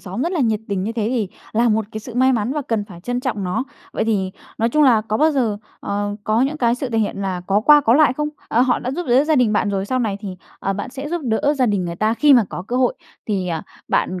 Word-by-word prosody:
xóm 190 +6 -4
rất 345 +4 -1
là 335 - 0
nhiệt 220 -3 +1
tình 195 -2 -1
như 220 +3 -2
thế 225 -1 -1
thì 230 -6 -1 0.2
là 235 +2 +3
một 220 0 +1
cái 215 - -5
sự 240 +2 -10
may 260 +1 +4
mắn 235 +2 0
và 300 -1 -2
cần 220 -3 0
phải 180 -5 -12
trân 245 +6 -2
trọng 235 -7 -2
nó. 180 +8 -1 0.3
Vậy - - -1
thì 195 -4 0 0.3
nói 230 +1 +2
chung 305 +5 +2
là 245 -6 +5
có 215 0 -2
bao 315 +4 +4
giờ, 230 -8 0 0.2
ờ, 205 0 -2
có 215 +2 +2
những 290 +3 0
cái 235 -4 +2
sự 255 0 -4
thể 225 - 0
hiện 210 - -1
là 185 -2 -2
có 200 +2 +2
qua 295 +5 +7
có 230 -3 +3
lại 305 -1 +5
không? 300 +2 -2 0.2
À, 235 - +2
họ 255 -1 +2
đã 255 - -4
giúp 345 +4 -4
đỡ 260 +4 +4
gia 310 -1 +2
đình 235 -4 +3
bạn 210 0 +1
rồi, 195 -1 -1
sau 255 +3 0
này 215 -5 -1
thì, 190 -4 -6 0.2
ờ, 195 - -1
bạn 205 +5 -5
sẽ 275 +3 -6
giúp 345 0 -2
đỡ 255 +6 +1
gia 255 -2 +2
đình 200 -4 0
người 170 0 -4
ta 215 +3 +1
khi 295 +3 +5
mà 235 - +5
có 180 - -6
cơ 245 - -1
hội 255 -1 +2 0.3
thì, 190 -4 -1
ờ, 165 -2 -2 0.3
bạn 185 -1 0
225 Hz, 295 wpm, -20 LUFS, 205-260 Hz, 0.3 s, qua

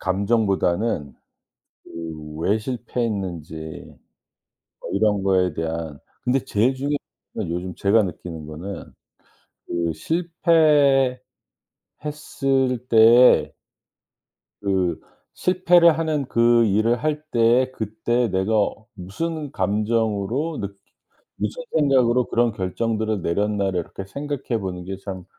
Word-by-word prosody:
감정보다는 100 -4 0 0.7
그 80 -2 -8
왜 100 +6 +1
실패했는지 105 - -4 1.3
뭐 - - -7
이런 105 0 +2
거에 90 -3 +2
대한 80 -2 -4 0.3
근데 125 +2 +2
제일 115 +6 +1
중요한 140 +2 -1 0.4
요즘 90 +2 -3
제가 105 +3 +3
느끼는 85 -4 -7
거는 85 +6 -8 0.8
그 85 -1 -1
실패했을 150 - +3 1.7
때에 115 +2 +6 1.1
그 95 -4 0 0.4
실패를 175 -3 +4
하는 155 -4 -1
그 115 0 +4
일을 110 +4 +2
할 150 -1 -1
때 120 +3 +3
그때 115 +3 -1
내가 95 +2 -1 0.4
무슨 150 - -5
감정으로 110 +7 -1
느끼 100 0 -6 0.6
무슨 - - -3
생각으로 125 -4 +3
그런 120 -1 +2
결정들을 110 +2 -2
내렸나를 100 +1 0
이렇게 95 +3 -8
생각해 140 -1 -3
보는 90 -2 -5
게 95 +1 -5
참 95 -3 -6
110 Hz, 215 characters per minute, -22 LUFS, 95-125 Hz, 1.7 s, 때에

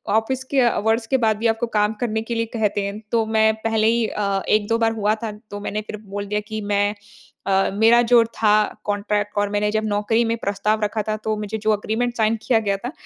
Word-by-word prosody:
Office 250 +4 0
के 275 - +3
hours 225 -1 +1
के 265 - +2
बाद 220 -1 +3
भी 230 - 0
आपको 225 +1 0
काम 210 -1 +1
करने 220 -2 -1
के 230 +1 -4
लिए 230 0 0
कहते 210 -3 0
हैं। 200 +1 -5
तो 230 -1 +2
मैं 220 0 +3
पहले 220 -1 +2
ही 235 0 +2
अ, 200 -2 -1
1-2 215 +2 +2
बार 225 -1 +2
हुआ 215 -1 +1
था। 220 - -2 0.2
तो 205 - -5
मैंने 210 +1 -3
फिर 210 - -6
बोल 200 0 -4
दिया 210 +1 -1
कि 215 0 -3
मैं 205 +1 +1 0.5
अ, 195 0 +2
मेरा 225 +3 +5
जो 240 0 +5
था 215 -2 +2 0.3
कॉन्ट्रैक्ट 205 0 -1
और 205 0 +1
मैंने 205 0 0
जब 215 0 0
नौकरी 210 +3 +1
में 230 0 0
प्रस्ताव 210 +1 -1
रखा 215 +1 -1
था 215 - 0
तो 215 0 0
मुझे 210 +1 -4
जो 215 0 +1
एग्रीमेंट 225 +3 -2
साइन 220 0 +2
किया 235 -3 +3
गया 200 -2 0
था 245 +6 -6
220 Hz, 230 wpm, -21 LUFS, 205-225 Hz, 0.5 s, मेरा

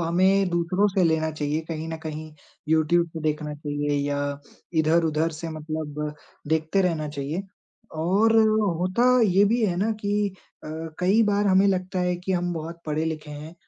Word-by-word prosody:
हमें 185 +3 +3
दूसरों 175 +4 +1
से 190 -1 +2
लेना 160 -1 +1
चाहिए, 150 0 -2
कहीं 160 -1 -4
न 165 - -4
कहीं 155 0 -6 0.4
यूट्यूब 160 +2 +3
से 160 - -6
देखना 150 -1 -2
चाहिए 145 0 -3 0.2
या 145 0 -1 0.6
इधर-उधर 160 0 +2
से 160 +2 -6
मतलब 150 -1 -4 0.3
देखते 160 +4 +1
रहना 160 -4 0
चाहिए 145 +5 -4 0.6
और 205 +7 +3 0.4
होता 185 +7 +1 0.2
ये 195 +2 +4
भी 225 +3 +2
है 180 -4 0
ना 210 +4 +1
कि 205 0 0 0.4
अ, - - -7 0.3
कई 195 +5 +4
बार 205 -1 +2
हमें 190 0 +5
लगता 185 -1 0
है 180 0 0
कि 180 +2 -3
हम 175 -1 0
बहुत 165 +1 -6
पढ़े-लिखे 155 0 -2
हैं 150 +3 -8
165 Hz, 160 wpm, -25 LUFS, 155-185 Hz, 0.6 s, हमें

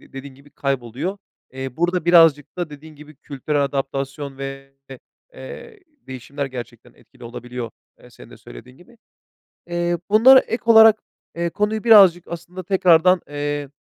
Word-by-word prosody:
dediğin 135 0 -12
gibi 140 +2 -21
kayboluyor. 140 - -4 0.3
Eee, 130 -1 -7
burada 175 0 -1
birazcık 165 -4 +4
da 175 -3 -4
dediğin 155 +2 -13
gibi 150 0 -15
kültürel 140 +2 -3
adaptasyon 135 0 -5
ve 135 0 -8 0.2
de, 130 - -10 0.4
eee, 470 -3 -11 0.3
değişimler 130 +2 -6
gerçekten 125 -3 -10
etkili - - -19
olabiliyor, 120 0 -8 0.3
ııı, - - -18
senin - - -16
de - - -14
söylediğin - - -15
gibi. 230 - -21 0.7
Eee, 175 0 -2
bunlara 255 +5 +7
ek 230 - -5
olarak, 220 -1 +7 0.4
eee, 170 0 -3
konuyu 210 +4 -2
birazcık 195 -7 +6
aslında 175 +2 -8
tekrardan, 180 -1 +3
eee, 145 -1 -4
150 Hz, 145 wpm, -20 LUFS, 135-180 Hz, 0.7 s, bunlara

